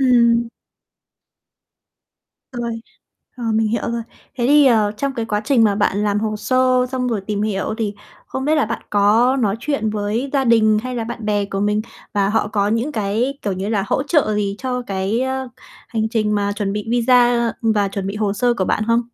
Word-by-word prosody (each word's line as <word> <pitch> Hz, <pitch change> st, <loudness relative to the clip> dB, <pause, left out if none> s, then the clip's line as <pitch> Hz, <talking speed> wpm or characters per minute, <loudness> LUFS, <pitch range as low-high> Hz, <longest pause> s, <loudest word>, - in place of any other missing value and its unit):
Ừm. 235 Hz, -2 st, +4 dB, 2.0 s
Rồi, 235 Hz, -2 st, -4 dB, 0.6 s
ờ, 245 Hz, -, -6 dB
mình 220 Hz, -1 st, +2 dB
hiểu 230 Hz, -, -1 dB
rồi. 235 Hz, 0 st, -2 dB, 0.4 s
Thế 240 Hz, -, +1 dB
thì, 290 Hz, 0 st, +6 dB
ờ, 215 Hz, -4 st, +3 dB
trong 275 Hz, +2 st, -2 dB
cái 230 Hz, -2 st, -2 dB
quá 210 Hz, -1 st, -1 dB
trình 235 Hz, -2 st, +4 dB
mà 205 Hz, -2 st, +3 dB
bạn 205 Hz, -1 st, +1 dB
làm 205 Hz, 0 st, +1 dB
hồ 215 Hz, -1 st, -2 dB
sơ, 255 Hz, +2 st, +2 dB
xong 250 Hz, -1 st, -1 dB
rồi 225 Hz, -4 st, -1 dB
tìm 210 Hz, -1 st, -1 dB
hiểu 210 Hz, 0 st, -1 dB
thì 210 Hz, -2 st, -2 dB, 0.3 s
không 265 Hz, -, -4 dB
biết 305 Hz, +2 st, +2 dB
là 300 Hz, -, +3 dB
bạn 230 Hz, -, -4 dB
có 215 Hz, +6 st, +3 dB
nói 210 Hz, -1 st, +1 dB
chuyện 275 Hz, -8 st, -1 dB
với 215 Hz, +6 st, -2 dB
gia 275 Hz, -2 st, +2 dB
đình 220 Hz, -3 st, +4 dB
hay 255 Hz, 0 st, -4 dB
là 225 Hz, -, -2 dB
bạn 230 Hz, -1 st, -6 dB
bè 205 Hz, -1 st, +1 dB
của 195 Hz, 0 st, -4 dB
mình, 210 Hz, +1 st, +1 dB, 0.3 s
và 200 Hz, -2 st, +1 dB
họ 215 Hz, +1 st, +1 dB
có 205 Hz, -1 st, 0 dB
những 230 Hz, +7 st, -1 dB
cái, 225 Hz, +6 st, -1 dB
kiểu 200 Hz, -, -1 dB
như 190 Hz, +2 st, -3 dB
là, 205 Hz, -3 st, 0 dB
hỗ 265 Hz, -, 0 dB
trợ 280 Hz, -7 st, +1 dB
gì 200 Hz, -1 st, -1 dB
cho 250 Hz, -1 st, -3 dB
cái, 195 Hz, +4 st, -1 dB
ơ, 260 Hz, 0 st, -2 dB, 0.4 s
hành 220 Hz, -2 st, -1 dB
trình 215 Hz, -2 st, 0 dB
mà 205 Hz, 0 st, 0 dB
chuẩn 200 Hz, -1 st, -2 dB
bị 210 Hz, +1 st, -4 dB
visa, 240 Hz, -1 st, +3 dB
ừm, 225 Hz, -, +3 dB
và 205 Hz, -2 st, +1 dB
chuẩn 195 Hz, 0 st, -4 dB
bị 195 Hz, -, -4 dB
hồ 210 Hz, -2 st, 0 dB
sơ 240 Hz, +3 st, +1 dB
của 190 Hz, -, -1 dB
bạn 215 Hz, -, 0 dB
không? 230 Hz, +1 st, +3 dB
225 Hz, 215 wpm, -19 LUFS, 205-245 Hz, 2.0 s, thì